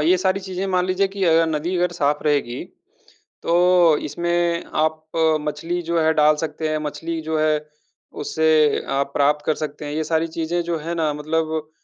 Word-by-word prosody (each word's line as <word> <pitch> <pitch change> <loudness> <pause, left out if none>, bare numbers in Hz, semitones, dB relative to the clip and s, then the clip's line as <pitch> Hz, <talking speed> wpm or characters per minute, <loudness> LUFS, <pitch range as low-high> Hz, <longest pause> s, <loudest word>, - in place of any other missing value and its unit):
ये 180 +4 +4
सारी 190 +1 +1
चीज़ें 190 0 -4
मान 185 -1 +1
लीजिए 190 +1 +1
कि 195 -1 -3
अगर 165 -1 +4
नदी 160 +4 -1
अगर 175 0 +1
साफ़ 150 -3 0
रहेगी, 140 -5 0 0.8
तो 175 -2 +4
इसमें 170 +1 -1
आप 155 0 0 0.4
मछली 165 +4 -3
जो 170 0 -1
है 160 0 +3
डाल 150 0 +4
सकते 155 0 -3
हैं, 155 0 0
मछली 160 +2 -4
जो 160 0 -2
है 155 0 +2 0.6
उसे 155 -1 +3
आप 140 0 -1
प्राप्त 145 +1 +2
कर 155 - +2
सकते 150 -1 -6
हैं। 145 - -5
ये 155 0 -1
सारी 160 +1 0
चीज़ें 165 +2 -2
जो 170 0 -2
है 165 +3 -4
ना 155 -3 0
मतलब, 155 +1 -2
160 Hz, 185 wpm, -21 LUFS, 150-175 Hz, 0.8 s, ये